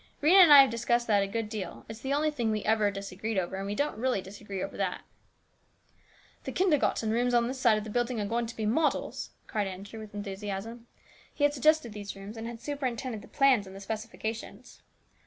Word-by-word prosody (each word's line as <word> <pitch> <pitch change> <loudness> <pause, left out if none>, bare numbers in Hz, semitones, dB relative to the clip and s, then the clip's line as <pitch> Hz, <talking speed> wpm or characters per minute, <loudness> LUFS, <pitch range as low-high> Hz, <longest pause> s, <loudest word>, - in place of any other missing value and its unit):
Rhena 350 +6 +7
and 340 -4 +8
I 285 -1 +12
have 270 - +3
discussed 235 +1 +1
that 205 -3 +3
a 195 - 0
good 225 +2 -3
deal. 210 -3 -6
It's 220 0 -8
the 265 +4 -4
only 300 +2 +2
thing 240 -7 -1
we 215 -1 -1
ever 215 -1 +3
disagreed 200 +2 -4
over, 185 0 -1
and 195 +1 -4
we 205 - -3
don't 285 -2 -1
really 255 -3 +1
disagree 195 0 -6
over - - -6
that." - - -2 0.7
" - - -33
These - - -6
kindergarten 295 - +2
rooms 245 +2 +1
on 235 0 +3
this 260 +1 -4
side 235 -4 +4
of 215 - -3
the 215 - -7
building 240 0 0
are 205 - -1
going 230 +3 -1
to 235 - -8
be 220 - -3
models! 295 +9 0
" - - -40
cried 210 -2 -1
Andrew 195 +4 -8
with 215 -1 -10
enthusiasm. 205 +3 -5 0.4
He 290 - -4
had 290 0 +4
suggested 295 -4 +2
these 205 -1 -7
rooms 195 +3 -9
and 225 0 -6
had 235 -1 -7
superintended 255 -4 -3
the - - -14
plans 260 -7 +3
and 190 +1 -10
specifications. 220 +2 -6
225 Hz, 220 wpm, -29 LUFS, 205-250 Hz, 0.7 s, I